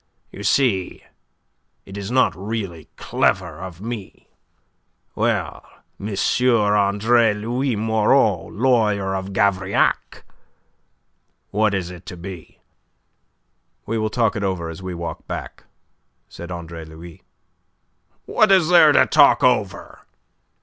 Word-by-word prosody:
You - - -10
see 100 -3 0 0.8
it 95 - -11
is 100 0 -5
not 125 -9 +2
really 95 -4 -5
clever 85 -4 -1
of 90 -2 -9
me. 110 -3 -8 0.8
Well, - - -1 0.4
M. 105 0 -5 0.3
Andre 105 +1 +3
Louis 120 +4 -2
Moreau, 110 -1 +2
lawyer 105 -5 +1
of 95 +1 -5
Gavrillac, 95 -1 0 1.3
what 105 0 +1
is 90 -2 -3
it 90 0 -12
to 90 - -8
be?" 90 -1 -10 1.3
"We 115 +1 -2
will 110 0 -1
talk 115 -1 0
it 105 - -3
over 90 -4 -2
as 80 - -10
we 95 -1 -6
walk 85 0 -7
back," - - -7 0.6
said 85 - -10
Andre 85 -2 -7
Louis. 80 +1 -12 1.0
"What 215 -2 +3
is 185 -4 +4
there 165 -4 +7
to - - +5
talk 145 -2 +5
over?" 110 -6 0
100 Hz, 115 wpm, -21 LUFS, 90-115 Hz, 1.3 s, there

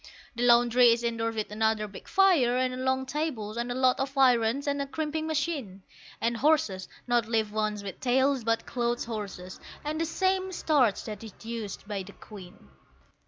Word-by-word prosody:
The 235 - -4
laundry 240 0 +6
is 235 +1 -3
indoors 230 -1 -1
with 215 -1 -3
another 220 0 0
big 200 - -12
fire, 335 -11 +4
and 255 0 -1
long 260 0 +1
tables, 265 -7 -3
and 240 +1 -3
a - - -3
lot 255 -1 +3
of 270 +1 -3
irons, 250 0 +3
and 285 0 -1
a 280 - -3
crimping 315 +2 -3
machine; 290 - -3 0.4
And 235 +1 0
horses 280 -10 +1 0.2
(not 240 -2 +1
live 220 -2 0
ones 210 -1 -2
with 195 -2 -7
tails, 260 +1 +2
but 230 0 0
clothes 240 -1 -1
horses) 200 -5 -6 0.3
and 310 +2 -2
the - - +1
same 375 +3 0
starch 270 - +2
that 215 0 -7
is 220 -3 -9
used 225 -3 -6
by 205 -2 -3
the 195 +2 -11
Queen. 185 - -13
240 Hz, 180 wpm, -28 LUFS, 215-275 Hz, 0.4 s, laundry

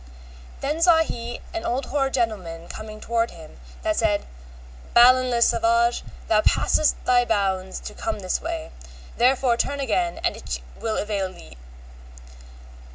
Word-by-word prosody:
Then 300 +4 -2
saw 335 -2 +6
he 240 -5 -6
an 335 -1 -3
old 255 +2 -1
hoar 275 -1 0
gentleman 190 -10 -2
coming 215 0 -8
toward 230 +1 0
him, 160 - -13 0.2
that - - 0
said, - - +1 0.7
Balin 255 +1 +7
le 235 -1 +3
Savage, 235 +1 +2 0.2
thou 215 -1 +4
passest 305 +6 +2
thy 245 -1 +4
bounds 195 -4 -1
to - - -8
come 335 - -3
this 185 -1 -1
way, 325 -1 -5 0.5
therefore 250 0 +3
turn 280 +3 -1
again 340 +7 0
and - - +1
it - - -5 0.2
will 225 -1 -2
avail 200 -3 -2
thee. 65 - -14
235 Hz, 145 wpm, -24 LUFS, 215-270 Hz, 0.7 s, Balin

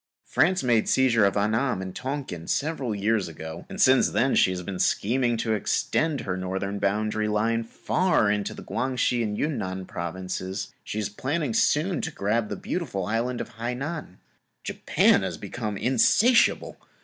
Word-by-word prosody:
France 185 0 +2
made 120 -3 +2
seizure 120 -5 +4
of 100 +1 +1
Anam 110 +3 +1
and 95 -1 -6
Tong 140 +1 -3
King 85 -6 -8
several 140 -7 -1
years 105 0 +1
ago 80 0 -8
and - - -7
since 130 0 +5
then 120 +6 +1
she 95 - +4
is 90 -1 -5 0.2
scheming 120 +2 +1
to 110 0 0
extend 145 +7 0
her 90 - -3
northern 95 +2 -3
boundary 105 +2 0
line 115 +2 +1
far 145 - +1
into 105 -1 -2
the - - -9
Quang 130 -1 -2
Se 120 0 +2
and 105 -2 -2
Yun 150 -4 -1
Nan 95 -1 -4
Provinces; 95 +3 -5
she - - -5
is 105 -2 0
planning 135 +5 -2
soon 160 - +2
to - - -2
grab 110 -4 -1
the - - -3
beautiful 125 - -3
island 115 +4 -1
of 115 - -9
Hainan. 125 - -4 0.5
Japan - - +3
has - - -2
also - - -15
become 110 -4 -4
insatiable. 220 - +3
110 Hz, 170 wpm, -26 LUFS, 100-130 Hz, 0.5 s, since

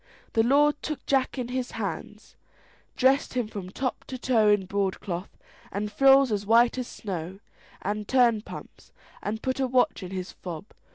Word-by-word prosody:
The 225 - +4
lord 290 +5 +3
took 305 -2 -5
Jack 270 0 +1
in 245 -2 -3
hands, 255 0 -5 0.6
dressed 265 +1 +3
him 245 -3 0
from 200 -4 -7
top 255 +6 -3
to 260 - -6
toe 240 -4 +3
in 205 -2 +3
broadcloth, 190 -1 -3 0.3
and 210 +1 -3
frills 270 +2 +6
as 205 -1 0
white 235 +4 +4
as 250 - -3
snow, 190 -4 -6 0.4
and 210 +1 -2
turnpumps, 235 -4 0 0.3
and 220 +2 -4
put 260 +1 -1
a 265 - +2
watch 250 -3 +2
in 185 - -6
his 185 -1 -5
fob. 175 0 -7
225 Hz, 160 wpm, -27 LUFS, 200-260 Hz, 0.6 s, frills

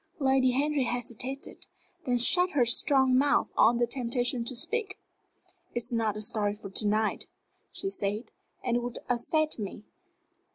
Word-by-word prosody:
Lady 265 -2 +3
Henry 280 +1 +1
hesitated, 245 +3 -6 0.4
then 245 -1 +2
shut 360 +9 +4
her 260 -4 +3
strong 260 +2 +3
mouth 280 +2 +3
on 235 +2 +5
the 240 - +3
temptation 245 0 -1
to 250 +2 -1
speak. 405 - -2 0.8
"It - - -1
is 240 +1 -2
not 220 -2 0
a 215 - -4
story 210 -2 0
for 205 -2 -10
to 210 +2 +1
night," 215 +1 0 0.4
she 390 - -4
said; 210 - -3 0.3
"and 240 -1 0
it - - +1
would 245 0 -5
upset 305 +5 0
me. 205 0 -6
245 Hz, 160 wpm, -29 LUFS, 230-270 Hz, 0.8 s, on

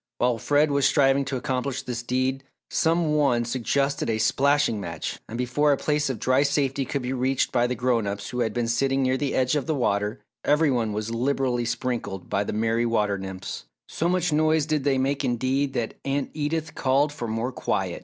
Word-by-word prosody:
While 120 -1 +1
Fred 145 +5 +2
was 140 -1 +3
striving 135 -1 +3
to 135 - -3
accomplish 130 0 -2
this 120 -2 -4
deed, 130 +2 -1 0.3
some 165 -1 +2
one 135 -6 +2
suggested 135 +3 0
a 110 - +1
"splashing 140 -1 +2
match" 85 -4 -5
and 115 - -5
before 125 +4 +2
a 140 - +3
place 150 0 0
of 130 - -2
dry 130 +4 +2
safety 140 -1 +1
could 140 +1 -3
be 125 +1 -2
reached 130 +1 0
by 120 -1 +2
the 125 - -2
grown 120 -3 +1
ups 100 0 -4
who 125 - -3
had 115 -2 +1
been 120 +1 -1
sitting 135 +3 +1
near 130 0 +2
the 140 +1 -1
edge 130 +2 +2
of 145 -1 -1
the 160 - +1
water, 105 -4 0 0.2
every 150 0 +3
one 115 -4 0
was 105 +2 -3
liberally 125 0 0
sprinkled 115 -5 -3
by 100 - +1
the - - -4
merry 115 +2 +1
water 105 -3 +1
nymphs. 95 -1 -6 0.2
So 170 - -1
much 180 -3 +1
noise 155 0 +3
did 155 -3 -1
they 135 -2 +3
make 135 +2 0
indeed, 130 +3 0
that 120 -4 -2
Aunt 140 0 -2
Edith 155 +1 -2
called 140 +3 +1
for 120 -5 -5
more 115 +3 -2
quiet. - - -2
130 Hz, 205 wpm, -25 LUFS, 115-140 Hz, 0.3 s, was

